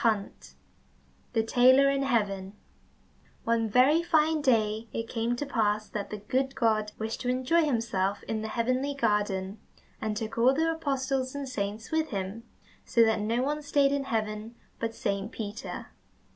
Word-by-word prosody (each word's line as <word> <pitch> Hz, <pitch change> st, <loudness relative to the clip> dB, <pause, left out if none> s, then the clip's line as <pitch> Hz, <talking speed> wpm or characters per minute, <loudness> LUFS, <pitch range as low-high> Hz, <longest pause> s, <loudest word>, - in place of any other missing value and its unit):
35 215 Hz, -4 st, -1 dB, 0.8 s
The 225 Hz, -2 st, +2 dB
Tailor 255 Hz, +4 st, +5 dB
in 275 Hz, 0 st, 0 dB
Heaven 205 Hz, -7 st, 0 dB, 0.9 s
One 230 Hz, -1 st, +1 dB
very 265 Hz, +9 st, +5 dB
fine 315 Hz, -2 st, +2 dB
day 220 Hz, -4 st, +1 dB
it 230 Hz, 0 st, -4 dB
came 230 Hz, +1 st, -1 dB
to 290 Hz, -, -3 dB
pass 215 Hz, -5 st, 0 dB
that 205 Hz, -2 st, -4 dB
the 210 Hz, -, -5 dB
good 260 Hz, +6 st, -1 dB
God 215 Hz, -3 st, +1 dB
wished 220 Hz, +1 st, -4 dB
to 250 Hz, -, -1 dB
enjoy 260 Hz, +7 st, +2 dB
himself 215 Hz, -7 st, -1 dB
in 220 Hz, -1 st, -3 dB
the 220 Hz, -, -3 dB
heavenly 255 Hz, +5 st, -1 dB
garden, 205 Hz, -5 st, 0 dB, 0.4 s
and 215 Hz, -1 st, -2 dB
took 220 Hz, +1 st, -4 dB
all 255 Hz, +3 st, +5 dB
the 325 Hz, +2 st, +2 dB
apostles 270 Hz, -4 st, -1 dB
and 285 Hz, -1 st, -4 dB
saints 210 Hz, -3 st, -4 dB
with 320 Hz, 0 st, +1 dB
him, 200 Hz, +3 st, -4 dB, 0.4 s
so 235 Hz, -, +4 dB
that 220 Hz, -1 st, +1 dB
no 230 Hz, +4 st, 0 dB
one 295 Hz, +2 st, -1 dB
stayed 285 Hz, -1 st, +2 dB
in 280 Hz, -1 st, -1 dB
heaven 215 Hz, -1 st, -3 dB, 0.2 s
but 230 Hz, 0 st, -3 dB
Saint 200 Hz, +1 st, -2 dB
Peter. 215 Hz, -3 st, -6 dB
230 Hz, 160 wpm, -28 LUFS, 215-270 Hz, 0.9 s, Tailor